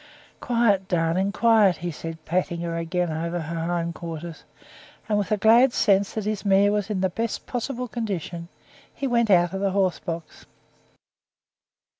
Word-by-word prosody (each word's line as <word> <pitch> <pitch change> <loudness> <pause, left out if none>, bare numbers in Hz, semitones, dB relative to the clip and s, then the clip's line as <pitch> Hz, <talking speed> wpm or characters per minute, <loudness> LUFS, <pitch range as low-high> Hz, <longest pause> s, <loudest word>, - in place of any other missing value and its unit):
"Quiet, 225 -6 +1
darling, 175 +3 +1
quiet!" 215 -3 +4
he 175 0 -4
said, 165 +1 -8
patting 170 0 -1
her 170 -1 -3
again 170 +1 -1
over 170 +2 -3
her 165 +1 -4
hind 170 -1 -1
quarters; 165 -1 -8 0.6
and 215 - +1
with 205 +1 -3
a 215 - +3
glad 235 +5 +5
sense 200 -2 +2
that 215 -2 -3
his 210 -1 -2
mare 200 0 +4
was 210 0 -1
in 200 -3 -1
the 190 - +2
best 225 +3 -3
possible 250 0 -3
condition, 185 -8 -4 0.4
he 280 - -5
went 235 -3 +2
out 175 -2 +4
of 195 - -3
the 200 - +1
horse 190 -2 +1
box. 165 -2 -7
190 Hz, 165 wpm, -24 LUFS, 170-215 Hz, 0.6 s, glad